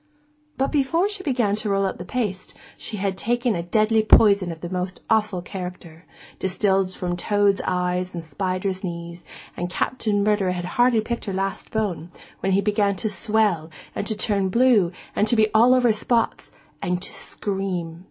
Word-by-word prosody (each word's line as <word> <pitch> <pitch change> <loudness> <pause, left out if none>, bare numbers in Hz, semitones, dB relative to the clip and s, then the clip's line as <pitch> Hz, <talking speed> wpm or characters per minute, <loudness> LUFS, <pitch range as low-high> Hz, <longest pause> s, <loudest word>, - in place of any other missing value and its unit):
But 270 - 0
before 320 +6 +2
she 410 -2 -4
began 245 - +1
to 215 0 -2
roll 195 0 +2
out 190 - -3
the - - -5
paste 205 -7 -3 0.2
she 215 - -5
had 195 -1 -1
taken 240 +2 0
a 170 - -1
deadly 215 +5 +2
poison 200 -4 +5
of 165 0 -10
a - - -2
most 180 0 -3
awful 215 -5 +1
character, 180 -2 -8 0.3
distilled 190 0 +1
from 180 -1 -3
toads' 205 +2 +2
eyes 180 0 -1
and 170 -1 -6
spiders' 185 +4 -2
knees; 170 -1 -6 0.3
and 175 0 -3
Captain 205 +1 0
Murderer 205 -3 +2
had 175 -1 -4
hardly 240 +4 +3
picked 235 +2 -4
her 195 - -3
last 195 0 -3
bone, 190 -7 -2 0.3
when 195 - 0
he 195 - +3
began 205 -1 +1
to 215 +4 -2
swell, 205 -5 +1 0.2
and 205 - -3
to 215 - 0
turn 200 -3 +1
blue, 230 -5 +4 0.2
and 210 - +2
to 235 - +3
be 215 -1 +3
all 230 +3 +6
over 245 -3 +4
spots, 230 +2 0 0.3
and 180 -2 -1
to - - -6
scream. 185 -5 -3
200 Hz, 180 wpm, -23 LUFS, 180-220 Hz, 0.3 s, all